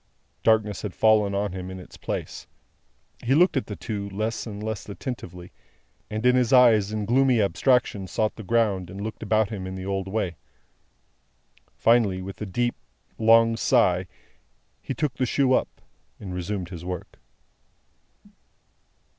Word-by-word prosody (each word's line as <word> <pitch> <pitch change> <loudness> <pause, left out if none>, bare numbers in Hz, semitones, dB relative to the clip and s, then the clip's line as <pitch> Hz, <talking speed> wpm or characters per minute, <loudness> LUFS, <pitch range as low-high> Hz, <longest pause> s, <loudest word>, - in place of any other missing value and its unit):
Darkness 110 -3 +2
had 105 -4 -5
fallen 105 -2 +3
on 100 0 -1
him 90 0 -6
in 95 0 -7
its 90 - -13
place. - - -5 0.8
He 130 +3 +2
looked 180 +3 +4
at 135 - -1
the 105 - -5
two, 100 -2 -5
less 110 +4 -3
and 105 -1 -7
less 110 -1 -5
attentively, 90 -6 -7 0.6
and 110 +2 -4
his 125 -1 +3
eyes 115 -6 +5
in 105 -1 -2
gloomy 130 +1 +3
abstraction 100 0 +1
sought 110 +4 -1
the - - -8
ground 105 -4 0
and 95 +2 -8
looked 110 +1 -6
about 110 -1 +1
him 95 -3 -5
in 95 - -6
the 95 0 -6
old 95 -1 -2
way. 95 -4 -2 1.4
Finally, 110 -6 +3
with 95 +2 -8
a 105 - -3
deep 120 +5 0 0.5
long 115 0 +5
sigh, 95 -7 +2 0.7
he 135 - -5
took 150 -4 -1
the 130 - +1
shoe 130 +1 +2
up, - - +2 0.5
and 95 -3 -7
resumed 90 0 -4
his 85 -3 -8
work. 90 -1 -7
105 Hz, 155 wpm, -25 LUFS, 95-115 Hz, 1.4 s, eyes